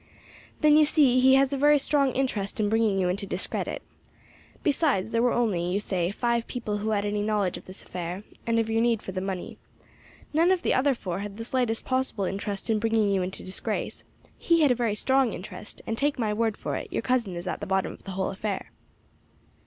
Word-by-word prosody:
"Then 300 -1 +6
you 310 - +7
see 290 -4 +4
he 265 +1 +6
has 270 +1 +3
a - - 0
very 295 +1 +6
strong 280 -1 +2
interest 225 -7 -1
in 210 -1 +2
bringing 220 -2 +2
you 185 -2 +1
into 200 +3 -2
discredit. 185 0 -3 0.8
Besides 285 - +1
there 230 - +2
were 245 0 +3
only, 215 -8 +1
you 195 - +1
say, 180 -4 -1
five 235 +3 -1
people 215 -5 -3
who 215 +1 -2
had 205 -1 0
any 205 0 -1
knowledge 205 -3 0
of - - -9
this 185 +1 -9
affair, 180 +2 -5 0.2
and 230 0 +2
of 225 -1 +1
your 225 0 +1
need 235 -2 +1
for - - -5
the 185 0 -3
money. 190 -2 -5 0.7
None 335 +4 +4
of 370 -2 +1
the - - +2
other 270 +1 +3
four 185 -5 -4
had 205 0 -6
the 225 - -5
slightest 245 -3 0
possible 255 -6 -1
interest 200 +1 -3
in 220 -2 +2
bringing 220 -2 +2
you 195 -1 +2
into 185 +1 -4
disgrace; 185 - -4 0.4
he 335 -1 +3
had 290 -4 +5
a - - +3
very 230 -3 0
strong 265 0 +2
interest, 200 +2 -9
and, 225 - -3
take 290 +1 +1
my 220 -4 0
word 220 0 0
for - - -3
it, - - -7
your - - -2
cousin 240 -8 0
is 175 +1 -5
at 185 - -3
the 205 - -5
bottom 190 0 0
of - - -16
the 195 - -7
whole 190 - 0
affair." 200 0 -4
220 Hz, 225 wpm, -27 LUFS, 195-255 Hz, 0.8 s, you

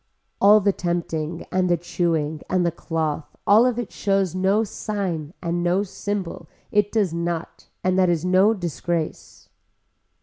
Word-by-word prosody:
All 210 +2 +8
the 200 +1 +3
tempting 170 -2 -3
and 185 -1 +1
the 175 - +3
chewing 160 -3 -1
and 185 -1 +2
the 170 - +2
cloth 160 -2 -3
all 220 +5 +6
of 245 -2 -1
it 240 -3 -4
shows 195 -3 0
no 190 +4 +2
sign 190 -7 -3
and 170 0 -1
no 175 +3 +2
symbol 195 -4 -5 0.2
it 205 -1 +2
does 205 -7 +1
not 170 0 -4 0.2
and 185 +1 +2
that 185 -1 +4
is 170 -1 0
no 190 +4 +4
disgrace. 170 - -4
180 Hz, 155 wpm, -23 LUFS, 170-200 Hz, 0.2 s, All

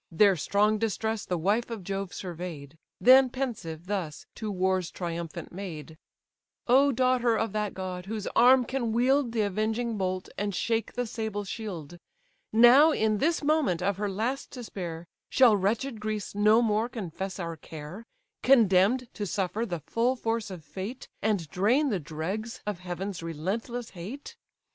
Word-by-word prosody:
Their 195 +4 +5
strong 210 +6 +2
distress 220 0 -1
the 180 - -1
wife 205 +9 +1
of 225 -5 -6
Jove 195 0 -3
survey'd; 165 -5 -7 0.2
Then 260 +1 +7
pensive 215 - -4
thus, 185 -6 -4
to 220 - -5
war's 185 -2 0
triumphant 170 -1 -5
maid: 165 -5 -7 0.7
"O 275 +3 +5
daughter 250 -2 +2
of 225 -2 -1
that 210 -2 -2
god, 185 -1 -5
whose 215 -1 -4
arm 250 +1 +6
can 240 -3 -2
wield 255 +2 +2
The 225 -2 +1
avenging 220 +3 -1
bolt, 185 -1 -2
and 205 -2 -2
shake 225 +2 -1
the 245 0 -1
sable 220 -2 -3
shield! 180 -6 -6 0.5
Now, 245 +7 +8
in 215 -6 +1
this 325 +4 +1
moment 285 - +2
of 200 0 0
her 205 0 -1
last 230 +8 -2
despair, 180 -9 -6 0.2
Shall 250 -5 +6
wretched 220 +5 -1
Greece 215 -1 -3
no 215 +3 +4
more 220 +1 +1
confess 190 -4 -5
our 170 -3 -4
care, 160 +7 -9 0.3
Condemn'd 235 0 +4
to 205 - -4
suffer 200 +5 -1
the 175 -4 -4
full 240 - 0
force 230 -3 -2
of 175 -5 -9
fate, 195 - -7
And 200 -7 0
drain 245 +11 +2
the 200 -6 0
dregs 175 +9 -5
of 210 -4 -3
heaven's 185 +1 -5
relentless 200 +9 -4
hate? 205 +11 -8
210 Hz, 155 wpm, -28 LUFS, 180-235 Hz, 0.7 s, Now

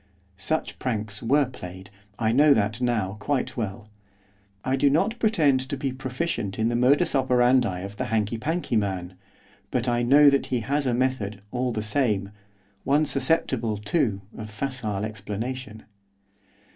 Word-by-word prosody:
Such 155 +12 -2
pranks 110 -4 -2
were 140 +5 +3
played. 95 -6 -10 0.3
I 110 -1 +1
know 145 +4 +5
that 105 +2 0
now 110 -5 0
quite 135 +4 -1
well. 105 -2 -4 0.8
I 130 - +1
do 140 +1 +3
not 165 +11 +1
pretend 155 - +3
to 140 - -3
be 135 0 -2
proficient 130 - -3
in 110 +1 +1
the 120 - -1
modus 140 +7 +3
operandi 125 -7 +2
of 100 +2 -8
the - - -2
hankey 110 0 -1
pankey 160 0 -2
man, 95 -3 -2 0.6
but 125 -1 -1
I 120 0 +1
know 140 +4 +6
that 140 - +1
he 125 -2 -1
has 140 +4 -1
a 120 - +1
method, 115 -6 -1
all 125 0 -1
the 110 -2 -3
same, 105 -4 0 0.5
one 145 +3 +3
susceptible, 130 -6 +2
too, 105 - -1
of 110 0 -7
facile 110 -3 -3
explanation. 110 +2 -6
120 Hz, 155 wpm, -25 LUFS, 105-135 Hz, 0.8 s, know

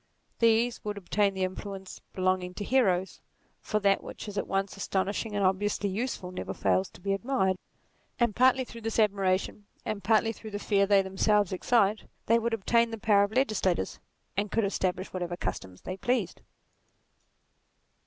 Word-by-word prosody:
These 230 +1 +3
would 210 -1 -4
obtain 200 +1 +1
the 190 - -1
influence 190 +1 -6
belonging 185 -1 0
to 205 - -4
heroes, 190 -6 +1 0.4
for 215 - -1
that 200 -1 +3
which - - -8
is 205 - -6
at 200 - -2
once 195 0 -1
astonishing 200 +2 -2
and 200 -1 +1
obviously 200 +2 +1
useful 195 -3 -3
never 185 - -5
fails 190 0 +1
to - - -15
be 195 +2 0
admired: 195 -3 +1 0.6
and 235 -3 +2
partly 260 +1 +4
through 235 -1 -10
this 225 0 -3
admiration, 200 -1 +1 0.3
partly 220 +3 +3
through 220 - -10
the 205 - -4
fear 200 -1 +2
they 200 -1 +5
themselves 200 +1 +2
excite, 210 +1 +2 0.2
they 230 +1 +4
would 230 0 0
obtain 230 +3 +2
the 225 - -5
power 205 -2 +4
of 200 - -8
legislators, 215 - 0 0.4
and 205 +2 -1
could 225 -2 +2
establish 185 -1 -2
whatever 175 -1 -3
customs 95 - -5
they 185 - -5
pleased. 250 +5 -1
200 Hz, 165 wpm, -29 LUFS, 190-225 Hz, 0.6 s, they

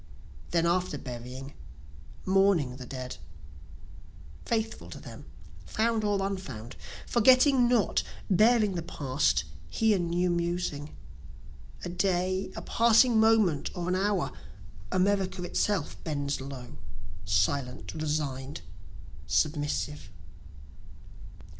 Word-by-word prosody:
Then 170 -1 +2
after 180 +2 +1
burying, 125 +2 -8 0.7
mourning 190 -9 +3
the 125 -2 -9
dead, 130 -1 -6 1.3
(Faithful 225 -1 -2
to - - -8
them - - -11 0.4
found 225 0 0
or 200 -2 +1
unfound, 130 - -5 0.3
forgetting 255 +2 +5
not, 240 -3 +2 0.3
bearing 215 +1 +4
the 175 - -2
past, 145 -4 0 0.3
here 215 - +2
new 175 +1 +1
musing,) 170 -4 -2 0.9
A - - -3
day 185 +1 0
a - - -6
passing 230 0 +4
moment 220 -9 +3
or 175 -1 -3
an 180 - +1
hour 200 +2 0 0.6
America 190 -1 +1
itself 205 +3 -1
bends 145 -3 -2
low, 130 - -8 0.5
Silent, 125 +7 0
resign'd, 150 -3 -3 0.7
submissive. 150 - -1
175 Hz, 95 wpm, -29 LUFS, 140-205 Hz, 1.3 s, forgetting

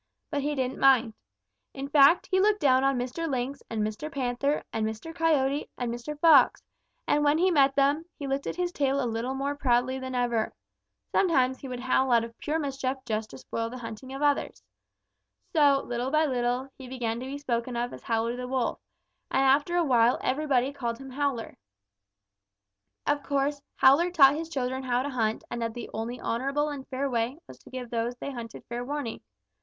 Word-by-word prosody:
But 290 -2 0
he 295 +1 -1
didn't 260 -1 -2
mind. 255 -4 +5 0.6
In 275 +1 -4
fact, 285 +4 +6
he 375 - +3
looked 415 +1 +3
down 260 -2 +4
on 270 -1 +2
Mr. 260 +7 -3
Lynx 265 +1 -2
and 220 -2 -1
Mr. 215 +9 -4
Panther 275 +2 -1
and 220 - -1
Mr. 220 +9 -4
Coyote 295 -4 +1
and 240 -2 -2
Mr. 290 +5 -6
Fox, 300 -6 +6 0.4
and 295 - +2
when 295 +1 +4
he 365 +3 +3
met 275 -4 +4
them, 285 +3 +2
he 285 - -6
lifted 275 +1 -2
his 360 -1 -1
tail 280 -4 0
a 265 - 0
little 235 +3 -2
more 275 +1 -1
proudly 260 -1 +1
than 260 -1 -5
ever. 240 -3 0 0.6
Sometimes 260 -8 +2
he 275 - -8
would 250 -1 -5
howl 260 0 +2
out 235 -1 +5
of 230 0 -8
pure 310 +1 -1
mischief 270 -3 -2
just 215 0 -2
to - - -10
spoil 230 0 -4
the 250 - -7
hunting 230 +2 -8
of 270 +1 -6
the - - +3
others. 290 -1 0 0.9
So, 285 -4 +4
little 245 +1 -2
by 310 +2 +3
little, 250 -1 -1
he 260 - -9
began 235 -3 -3
to 255 - -6
be 275 +1 -5
spoken 245 -3 -2
of 240 +1 -2
as - - -9
Howler 230 +1 -1
the 250 0 -5
Wolf, 255 -2 -1 0.5
and 270 - +2
after 285 +6 +3
a 345 -1 +3
while 240 -3 +4
everybody 275 -2 +1
called 235 -4 -3
him 270 +1 -10
Howler. 270 -4 -2 1.5
"Of 290 0 +1
course, 280 +1 -1
Howler 290 +7 +5
taught 280 -6 +6
his 320 +2 -4
children 260 -3 -2
how 250 -1 0
to 285 - -3
hunt 225 -4 -1
and 240 - -3
that 230 0 -3
the 240 - -7
only 230 +3 -4
honorable 275 +5 -1
and 280 -2 -7
fair 270 +1 -2
way 240 +1 -1
was - - -13
to - - -16
give 250 -2 -7
those 235 +1 -1
they 280 - -6
hunted 235 -3 -8
fair 240 +1 -4
warning. 280 -3 -4
265 Hz, 200 wpm, -27 LUFS, 240-285 Hz, 1.5 s, fact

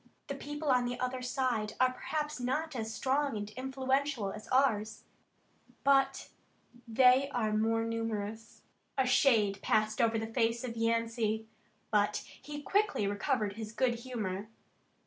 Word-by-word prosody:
The - - -1
people 295 +2 -4
on 250 -2 +4
the 245 0 -3
other 255 0 -2
side 250 -4 -1
are 255 0 +4
perhaps 300 +2 -3
not 300 +5 -1
as 225 -2 -3
strong 270 +1 0
and 205 0 -4
influential 265 -2 -1
as 215 +2 -9
ours, 220 -5 +1 0.8
but 270 -1 +3 0.6
they 255 +4 +5
are 220 -5 0
more 225 +1 +2
numerous." 225 -1 -4 0.3
A 265 - +3
shade 220 -6 +3
passed 215 +1 +1
over 230 -1 +3
the 220 - -2
face 230 0 +1
of 235 -2 -4
Yancey, 230 -1 0 0.5
but 205 -1 +2 0.2
he 295 0 -7
quickly 410 - +1
recovered 205 0 -1
his 220 -1 -5
good 240 -1 +1
humor. 215 -5 -4
235 Hz, 140 wpm, -32 LUFS, 220-265 Hz, 0.8 s, they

